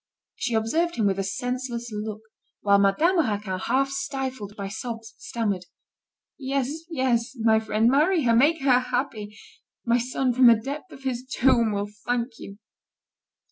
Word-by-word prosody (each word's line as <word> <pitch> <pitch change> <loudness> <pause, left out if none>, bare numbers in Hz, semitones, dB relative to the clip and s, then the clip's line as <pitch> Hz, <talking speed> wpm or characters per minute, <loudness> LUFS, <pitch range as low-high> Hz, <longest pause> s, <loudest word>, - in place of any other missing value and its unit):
She 240 -2 -2
observed 320 +11 0
him 220 - 0
with 195 -1 +1
a - - 0
senseless 240 +3 -3
look, 215 0 -5 0.4
while 200 -1 +4
Madame 310 - +3
Raquin, 205 - -1
half 270 +6 +1
stifled 265 -6 -4
by 200 -1 -4
sobs, 225 +2 -6
stammered: 205 -6 -2 0.7
"Yes, 275 +3 -2
yes, 260 -5 0
my 220 0 +4
friend, 220 0 +1
marry 310 +6 +3
her, 230 -2 +3
make 295 +6 +4
her 255 -2 +5
happy; 245 -5 -3 0.5
my 235 +1 +3
son, 250 +1 0
from 255 0 +6
the 235 - +8
depth 280 +9 -6
of 265 - -13
his 255 -2 -2
tomb, 240 -3 +3
will 205 0 -3 0.2
thank 245 -1 -1
you." 200 - -10
240 Hz, 155 wpm, -25 LUFS, 215-270 Hz, 0.7 s, the